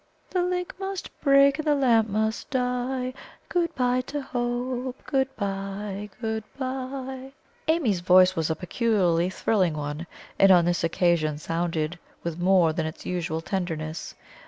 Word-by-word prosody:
"The 365 - +1
link 360 0 -1
must 385 -1 -4
break, 275 0 +5
and 310 - -3
the 295 - +4
lamp 230 -5 +3
must 220 +2 -1
die; 250 0 -1 0.4
Good 340 -2 0
bye 250 0 +2
to 290 - -3
Hope! 245 +1 -2
Good 270 -2 0
bye 200 0 -4
good 220 -2 -2
bye!" 265 0 -5 0.3
Amy's 295 - +2
voice 185 +1 +6
was 160 -1 0
a 160 - +1
peculiarly 180 -2 +1
thrilling 185 -3 +1
one, 150 +2 -4 0.3
and 195 0 +7
on 175 -2 +6
this 175 -1 +1
occasion 165 -3 +2
sounded 165 +1 -2 0.2
with 170 0 -4
more 175 -3 +4
than 160 -1 -1
its 160 - -8
usual 165 -3 -2
tenderness. 165 -4 -4
210 Hz, 145 wpm, -26 LUFS, 175-260 Hz, 0.4 s, and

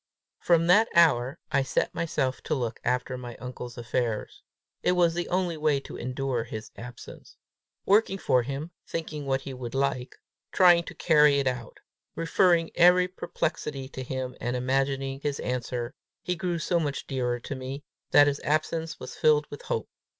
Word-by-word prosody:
From 170 -1 +3
that 205 +6 +6
hour 140 -4 +4
I 140 - +3
set 135 - -1
myself 150 -6 -1
to 155 - 0
look 120 -4 -3
after 125 +1 -1
my 120 -2 -8
uncle's 125 0 -8
affairs. 115 -2 -2 0.4
It - - +2
was 175 -2 +3
the 175 +1 -3
only 180 -2 0
way 150 -2 +2
to - - -10
endure 130 -1 -2
his 110 -1 -8
absence. 120 +1 -11 0.5
Working 200 -1 +3
for 125 -8 +2
him, 140 +6 -5 0.2
thinking 155 -3 -5
what 135 0 +1
he 135 0 -7
would 125 -1 -6
like, 135 -2 -1 0.4
trying 175 -2 +6
to - - -9
carry 150 -3 +5
it 140 - +1
out, 125 -3 -3 0.3
referring 165 0 +3
every 180 +1 +6
perplexity 150 -6 -3
to 130 - -7
him 130 0 -4
and 120 +1 -1
imagining 135 +1 0
his 145 -1 -2
answer, 125 0 -3 0.3
he 180 - -1
grew 175 -1 -2
so 170 +2 +1
much 145 -3 -2
dearer 125 -2 -1
to - - -5
me, 135 +2 -6 0.3
that 145 - +7
his 145 -1 0
absence 160 +2 -1
was - - -8
filled 150 -1 +4
with 145 - -8
hope. 110 - -3
140 Hz, 170 wpm, -27 LUFS, 125-165 Hz, 0.5 s, that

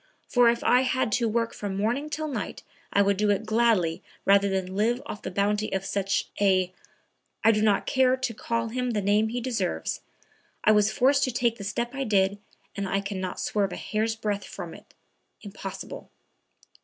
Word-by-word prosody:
For 245 -2 +5
if 235 0 0
I 250 - +5
had 255 -3 0
to 235 +2 +2
work 230 +1 0
from 200 -2 -4
morning 240 +9 0
till 310 +1 -3
night 240 -9 -5 0.3
I 200 - +4
would 200 -1 +2
do 210 +1 +2
it 205 +2 +1
gladly 215 -7 +2 0.2
rather 200 0 +5
than 190 -1 -2
live 230 +4 +2
off 210 - -6
the - - -4
bounty 205 +3 0
of 195 0 -2
such 195 0 -1
a, 185 -2 +3 0.7
I 225 - +7
do 210 -1 +1
not 210 -2 +3
dare 260 -1 +3
to 255 -3 -2
call 230 +1 -2
him 250 +2 -2
by - - -1
the 195 - -4
name 210 +2 +3
he 245 +2 -2
deserves, 230 - -2 0.6
I 215 - +6
was 210 0 +4
forced 275 +2 +3
to 255 - -2
take 235 -1 +1
the - - -6
step 235 +5 -2
I 275 0 -2
did 200 -3 +2 0.4
and 200 -1 -3
I 195 - +1
can 200 -1 -4
not 185 -1 -4
swerve 200 -2 0
a - - -5
hair's 220 +1 -1
breadth 210 -2 -2
from - - -7
it; - - -15 0.5
impossible." 195 - -8
215 Hz, 200 wpm, -26 LUFS, 200-235 Hz, 0.7 s, I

